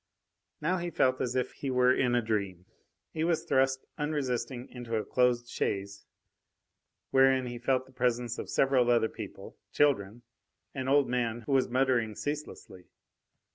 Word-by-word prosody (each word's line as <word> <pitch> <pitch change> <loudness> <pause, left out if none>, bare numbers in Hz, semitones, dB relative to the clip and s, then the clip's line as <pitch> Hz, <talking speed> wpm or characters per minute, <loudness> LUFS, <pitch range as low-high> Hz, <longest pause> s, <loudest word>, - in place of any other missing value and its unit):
Now 180 +5 +1
he 175 0 -3
felt 130 -5 +1
as 125 0 -2
if 125 - 0
he 140 - -5
were 125 0 +4
in 125 -2 +1
a 120 - +2
dream. 100 -5 -2 0.5
He 160 - -1
was 165 -1 +1
thrust 130 0 +1
unresisting 130 -4 -2
into 120 -2 -5
a 110 - -1
closed 125 -1 +1
chaise, 100 -3 -3 1.0
wherein 130 -1 +4
he 120 -1 -6
felt 130 +1 +1
the 130 - -19
presence 120 -2 -1
of - - -6
several 130 -3 +3
other 115 -2 +3
people - - -9
children, 120 -6 +1 0.5
an 130 -2 -4
old 140 0 +4
man 120 -2 -1
who 115 - -6
was 135 -2 +3
muttering 125 -4 +1
ceaselessly. 145 -11 -6
125 Hz, 155 wpm, -30 LUFS, 120-135 Hz, 1.0 s, were